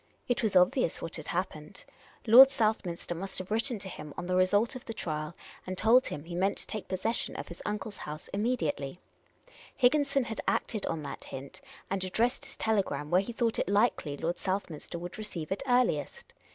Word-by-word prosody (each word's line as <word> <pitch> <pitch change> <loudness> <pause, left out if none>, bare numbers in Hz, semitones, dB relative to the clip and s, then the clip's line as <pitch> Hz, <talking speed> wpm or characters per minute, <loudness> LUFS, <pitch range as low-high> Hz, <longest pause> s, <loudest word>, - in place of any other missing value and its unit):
It 245 - +1
was 215 -4 0
obvious 180 -2 +4
what 165 - -5
had 155 - -7
happened. 165 -4 -4 0.4
Lord 250 +4 +10
Southminster 215 -9 -1
must 190 +3 -6
have 185 +2 -6
written 230 +2 0
to 195 - -7
him 150 -5 -8
on - - -4
the 180 +1 0
result 205 +7 +3
of 255 - -7
the 225 - -6
trial, 155 0 -3 0.3
and 185 0 -4
told 230 +6 +5
him 145 - -5
he 170 +2 -8
meant 190 +3 +1
to - - -5
take 215 - -6
possession 220 +5 -1
of - - -6
his 170 - -9
uncle's 210 0 -3
house 150 +1 -7
im 200 - 0
mediately. 175 - -1 0.8
Higginson 275 +1 +3
had 220 -2 -4
acted 215 -3 0
on 160 -2 -2
that - - -7
hint, 135 - -8 0.3
and 195 -1 0
addressed 235 +9 0
his 270 - -14
telegram 185 -10 0
where 180 +2 +5
he 200 - -5
thought 230 -1 0
it - - 0
likely 200 -8 +2
Lord 170 +3 -2
Southminster 185 -4 -3
would 175 +4 -7
receive 175 -7 -5
it 195 - -1
earliest. 245 - +1
195 Hz, 195 wpm, -30 LUFS, 170-225 Hz, 0.8 s, Lord